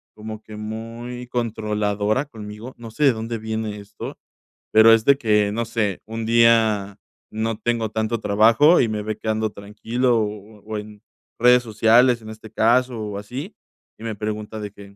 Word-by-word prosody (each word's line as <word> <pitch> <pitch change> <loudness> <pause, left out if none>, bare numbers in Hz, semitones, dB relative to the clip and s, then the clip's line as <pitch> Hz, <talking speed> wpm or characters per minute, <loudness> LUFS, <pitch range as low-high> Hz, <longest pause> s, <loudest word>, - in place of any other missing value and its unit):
Como 110 0 -8
que 110 -1 -10
muy 115 +3 -7
controladora 105 0 -1
conmigo, 110 -1 -10
no 115 -1 -10
sé 150 +7 0
de 135 - +5
dónde 115 0 -4
viene 110 -1 -4
esto, 100 +1 -9 0.5
pero 110 +1 +7
es 115 0 +3
de 140 -1 +5
que, 105 -5 +2
no 115 +1 -1
sé, 105 -4 -2
un 115 +1 -5
día 110 -3 +3 0.3
no 110 0 -2
tengo 115 -1 -1
tanto 110 +1 -1
trabajo 110 +11 +5
y 115 - +1
me 105 -1 -3
ve 110 0 -4
que 110 - -5
ando 110 0 0
tranquilo 115 +4 -1
o 105 0 -5
o 110 0 -4
en 105 0 -9 0.4
redes 125 +1 +5
sociales, 115 +2 +4
en 110 - -10
este 110 0 -11
caso, 125 +2 +2
o 105 -2 -5
así, 130 - -7 0.4
y - - -13
me 110 -2 -4
pregunta 105 +1 -5
de 105 -1 -6
que: 100 -1 -14
110 Hz, 175 wpm, -22 LUFS, 105-115 Hz, 0.5 s, pero